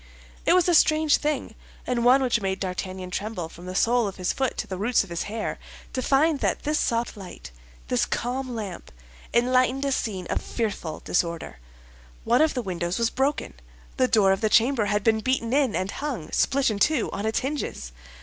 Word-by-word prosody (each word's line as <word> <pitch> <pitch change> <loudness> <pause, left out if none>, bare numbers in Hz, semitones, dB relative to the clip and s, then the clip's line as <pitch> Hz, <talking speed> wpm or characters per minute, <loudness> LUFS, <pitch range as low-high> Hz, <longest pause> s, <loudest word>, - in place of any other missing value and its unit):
It - - +6
was 365 -1 +4
a 350 - +3
strange 310 -1 +4
thing, 300 -1 -2 0.3
and 245 -2 0
one 260 +3 +5
which 240 -3 +1
made 190 -1 -2
D'Artagnan 185 0 -4
tremble 195 -4 -4
from 175 +2 -12
the 185 - -5
sole 235 +2 +3
of 195 - -6
his 185 -1 -1
foot 265 -2 -1
to - - -2
the 185 -1 -6
roots 235 +5 +2
of - - -13
his 170 - -2
hair, 220 +1 -3 0.3
to 255 - -1
find 285 +3 +3
that - - -1
this 300 +1 0
soft 235 0 0
light, 190 - -10 0.4
this - - +1
calm 250 +1 -3
lamp, 200 -6 -6 0.4
enlightened 255 +3 +2
a 275 - 0
scene 200 -8 -2
of - - 0
fearful 205 -8 -3
disorder. 170 - -2 0.6
One 240 +5 +3
of 315 -2 +3
the 250 - -1
windows 175 -2 -2
was 230 0 +1
broken, 270 - -1 0.4
the 255 - +3
door 205 -5 +4
of 195 - 0
the 215 - +2
chamber 230 +1 +3
had 205 0 0
been 220 -1 +3
beaten 250 0 0
in 275 -6 +2
and 185 +2 -1
hung, 255 - -5
split 270 -2 +2
in 205 - -3
two, 300 +1 +2
on 205 +2 -2
its 220 - 0
hinges. 265 - -4
230 Hz, 200 wpm, -25 LUFS, 195-265 Hz, 0.6 s, It